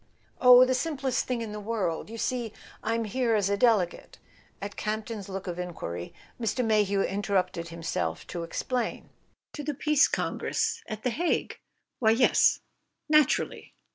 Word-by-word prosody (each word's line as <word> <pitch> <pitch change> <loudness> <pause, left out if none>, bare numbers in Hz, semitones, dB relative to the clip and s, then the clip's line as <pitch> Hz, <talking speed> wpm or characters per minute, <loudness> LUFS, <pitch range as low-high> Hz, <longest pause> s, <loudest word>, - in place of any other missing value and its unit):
"Oh, 250 0 +9
the 255 - +1
simplest 270 -2 -1
thing 245 -2 -1
in 220 - -6
the 210 - -5
world. 205 -5 -2
You 230 - -7
see, 235 -2 -2 0.3
I'm 230 +1 -1
here 230 +1 0
as 200 -2 +1
a - - +3
Delegate 200 -5 +1 0.2
" - - -32
At 200 0 -5
Campton's 215 -1 -4
look 195 0 -5
of 175 -1 -5
enquiry, 125 - -5 0.3
Mr. 235 +2 0
Mayhew 205 -3 +2
interrupted 190 -4 -1
himself 165 0 -3
to 175 - -5
explain: 235 +8 -3 0.4
"To 295 - -6
the 295 0 -3
Peace 300 +1 +4
Congress - - -1
at 215 0 -6
The 250 - +1
Hague 340 +8 -1 0.4
why, 220 - +4
yes: 235 +3 +4 0.5
naturally. 305 -3 +2
220 Hz, 155 wpm, -28 LUFS, 195-250 Hz, 0.5 s, Oh